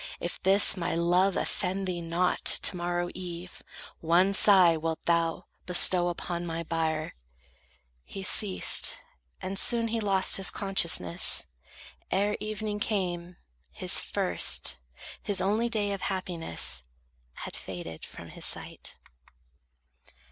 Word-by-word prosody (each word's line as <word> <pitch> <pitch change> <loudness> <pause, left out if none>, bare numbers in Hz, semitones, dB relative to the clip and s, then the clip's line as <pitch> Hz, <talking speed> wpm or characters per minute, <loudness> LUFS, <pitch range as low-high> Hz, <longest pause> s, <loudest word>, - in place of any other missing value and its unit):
If 175 - -6
this, 195 +2 +6
My 170 -3 -3
love 175 +3 +1
offend 190 +1 -3
thee 180 -2 -4
not, 170 +2 -1
to - - +2
morrow 175 0 -3
eve 180 0 -9 0.4
One 175 +4 +2
sigh 185 -4 +7
wilt 160 0 -4
thou 170 -1 0 0.2
bestow 180 0 +6
upon 175 0 -4
my 165 -1 -5
bier." 160 -1 -3 0.9
He 195 - -9
ceased; 190 0 +2 0.5
and 190 +1 -3
soon 230 -1 +2
he 230 +1 -2
lost 195 -3 +1
his 195 - 0
consciousness: 170 - 0 0.6
Ere 205 +2 0
evening 215 0 -5
came, 180 -4 -3 0.3
his 65 - +1
first, - - 0 0.4
his 205 -3 -2
only 215 +5 0
day 210 -3 -2
Of 195 -1 -5
happiness 165 - -2 0.5
had - - -8
faded 85 -3 -8
from - - -11
his - - -10
sight. - - -3
180 Hz, 120 wpm, -27 LUFS, 170-195 Hz, 0.9 s, sigh